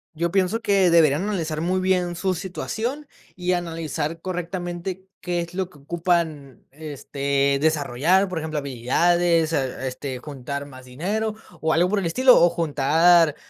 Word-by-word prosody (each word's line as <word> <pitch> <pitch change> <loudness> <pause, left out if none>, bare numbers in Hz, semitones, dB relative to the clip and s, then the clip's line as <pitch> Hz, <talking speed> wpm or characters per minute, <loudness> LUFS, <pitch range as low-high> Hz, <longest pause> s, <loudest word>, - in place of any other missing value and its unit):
Yo 170 +2 -1
pienso 195 +4 +1
que 200 -4 +3
deberían 160 -3 +4
analizar 165 -7 -2
muy 185 +3 0
bien 180 -2 +1
su 185 +2 0
situación 225 - -4 0.3
y 180 0 -1
analizar 165 -2 -3
correctamente 180 +1 -4 0.2
qué 175 -1 -1
es 170 0 -7
lo 185 -1 -2
que 155 - -18
ocupan, 160 -3 -2
este, 140 -1 -1
desarrollar, 155 +5 +2
por 180 -3 -3
ejemplo, 155 -1 -4
habilidades, 165 +5 +1
ah, 135 -2 -2
este, 130 0 -4
juntar 140 +1 -6
más 130 -2 -13
dinero 205 +12 -2 0.3
o 160 0 +1
algo 175 +2 +3
por 205 +1 +1
el 190 - -3
estilo, 255 +8 +5
o 175 - +6
juntar 165 +1 +3
170 Hz, 150 wpm, -23 LUFS, 145-180 Hz, 0.3 s, o